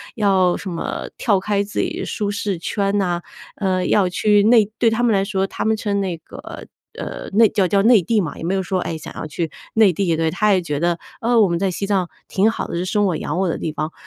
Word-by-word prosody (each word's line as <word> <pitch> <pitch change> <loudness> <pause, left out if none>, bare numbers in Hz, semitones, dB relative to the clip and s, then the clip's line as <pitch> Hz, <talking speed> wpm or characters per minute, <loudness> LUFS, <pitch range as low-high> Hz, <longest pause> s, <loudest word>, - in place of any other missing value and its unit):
要 190 -5 +3
什 195 - -6
么 170 -2 -4
跳 205 -5 +2
开 200 +1 0
自 205 - -5
己 - - -3
舒 205 -1 -2
适 200 -2 -2
圈 200 +3 -1
呐， 175 -3 0 0.3
呃， 185 -3 0
要 195 -1 +3
去 205 +3 +3
内 220 -2 +5
对 230 - +4
他 225 +2 0
们 235 -2 +3
来 195 -1 +2
说， 195 -1 -1
他 - - -4
们 220 0 +2
称 205 -2 -1
那 185 -3 -2
个， 160 - -10 0.3
呃， - - -6
内 220 +1 +6
叫 195 -3 +1
叫 195 +2 +2
内 225 -2 +6
地 220 +2 +2
嘛， 165 - -5
也 - - -8
没 180 - -1
有 190 - 0
说， 185 0 -1
哎， 165 - -3
想 - - -9
要 - - -5
去 160 +1 -3 0.2
内 220 -3 +5
地， 175 -2 0
对， 160 0 +1
他 210 +2 +2
也 185 - +2
觉 150 -4 -3
得： 170 +1 0 0.2
“呃， 235 0 +3
我 205 - +5
们 170 -1 0
在 190 +1 0
西 200 +2 -3
藏 190 -3 +1 0.2
挺 205 +4 +2
好 - - -4
的， - - -5
是 175 +2 -2
生 205 +2 +1
我 185 -4 +1
养 150 +5 -3
我 190 -2 +1
的 - - -2
地 160 - -3
方。” 155 +1 -3
195 Hz, 275 characters per minute, -20 LUFS, 175-210 Hz, 0.3 s, 内